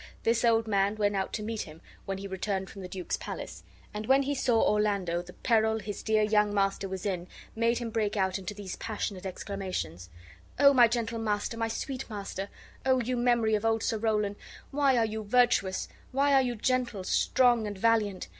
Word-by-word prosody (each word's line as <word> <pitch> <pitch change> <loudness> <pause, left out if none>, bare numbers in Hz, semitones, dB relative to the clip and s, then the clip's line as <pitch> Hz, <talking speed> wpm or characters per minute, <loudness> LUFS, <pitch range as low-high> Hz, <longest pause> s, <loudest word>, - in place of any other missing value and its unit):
This 230 +1 +2
old 225 -1 +3
man 200 0 +2
went 205 -1 +1
out 190 -1 -1
to 210 - -3
meet 225 0 -3
him 155 0 -9 0.3
when 195 0 -3
he 195 - -7
returned 190 0 -3
from 195 - -9
the 185 - -6
duke's 180 -1 -3
palace, - - -7 0.3
and 210 +1 -5
when 270 +1 +5
he 285 +1 -1
saw 245 -4 +2
Orlando 200 -6 +1
the 180 +1 -12
peril 220 -2 +2
his 210 -2 -6
dear 220 -1 +2
young 210 -1 +3
master 195 -1 0
was 190 0 -5
in 180 -3 -2 0.3
made 230 +1 +2
him 235 -2 -4
break 215 -1 -1
out 190 0 +1
into 195 +2 -6
these 200 -2 -6
passionate 200 -3 -4
exclamations: 180 - -5 0.5
"O 280 0 +7
my 245 -3 +7
gentle 230 0 -2
master, 210 0 -1
my 230 0 -1
sweet 260 +3 -4
master! 200 -2 -5 0.3
O 260 -1 +3
you 250 +1 -1
memory 240 -2 +2
of 210 0 +1
Old 225 -1 +1
Sir 220 - 0
Rowland! 210 -2 0 0.3
Why 275 -2 +3
are 230 - +3
you 220 0 -4
virtuous? 215 -4 +2 0.2
Why 280 +2 +2
are 270 - +6
you 245 -2 -1
gentle, 240 -3 -1
strong, 240 +2 +3
and 205 -1 -5
valiant? 210 -2 +1
215 Hz, 200 wpm, -29 LUFS, 195-235 Hz, 0.5 s, O